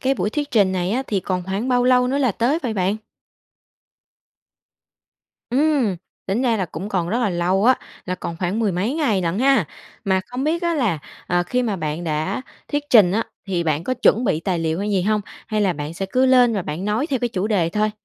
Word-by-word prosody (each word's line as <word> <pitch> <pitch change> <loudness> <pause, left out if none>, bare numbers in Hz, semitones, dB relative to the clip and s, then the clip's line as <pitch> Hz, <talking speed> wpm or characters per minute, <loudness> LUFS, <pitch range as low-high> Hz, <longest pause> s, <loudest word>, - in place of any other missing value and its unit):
cái 270 +1 +1
buổi 210 - -1
thuyết 290 +1 -3
trình 200 -6 +3
này 185 0 -1
á, 255 +4 0
thì 200 -3 0
còn 180 0 -2
khoảng 195 +7 -2
bao 245 -1 +3
lâu 250 0 +4
nữa 275 +2 0
là 255 -6 +2
tới 250 - +1
vậy 230 -4 -2
bạn? 195 +2 0 2.5
Ừm, 265 - +2 0.3
tính 205 +7 0
ra 235 -3 +2
là 190 - 0
cũng 170 +5 -6
còn 180 -4 -1
rất 230 +5 0
là 225 -5 +1
lâu 180 +4 +1
á, 255 +1 +6 0.3
là 185 - -2
còn 170 -2 -6
khoảng 185 +4 -1
mười 215 -4 +1
mấy 200 +10 -1
ngày 265 - +1
lận 170 +3 -1
ha. 265 - +4 0.4
Mà 190 -1 +2
không 250 +2 -4
biết 335 +3 0
á 340 -1 +1
là, 220 - +1 0.3
ờ, 175 0 +1
khi 250 +8 -1
mà 215 -5 -1
bạn 155 0 -3
đã 160 +9 -2 0.3
thuyết 290 0 0
trình 200 -7 +7
á, 225 +2 +1 0.2
thì 175 -3 -1
bạn 155 +1 0
có 255 - 0
chuẩn 245 -1 +3
bị 160 -7 +1
tài 180 -1 -1
liệu 160 0 -1
hay 205 +2 -2
gì 190 -3 +1
hông? 210 +1 +1 0.3
Hay 215 -1 -1
là 195 -3 +2
bạn 150 0 -6
sẽ 195 +3 -3
cứ 260 +1 +4
lên 250 -3 +5
và 195 - -1
bạn 160 +5 -5
nói 215 +8 0
theo 270 -6 -1
cái 245 - -1
chủ 200 -2 -2
đề 185 -7 +1
thôi? 215 +2 +1
210 Hz, 235 wpm, -21 LUFS, 180-250 Hz, 2.5 s, trình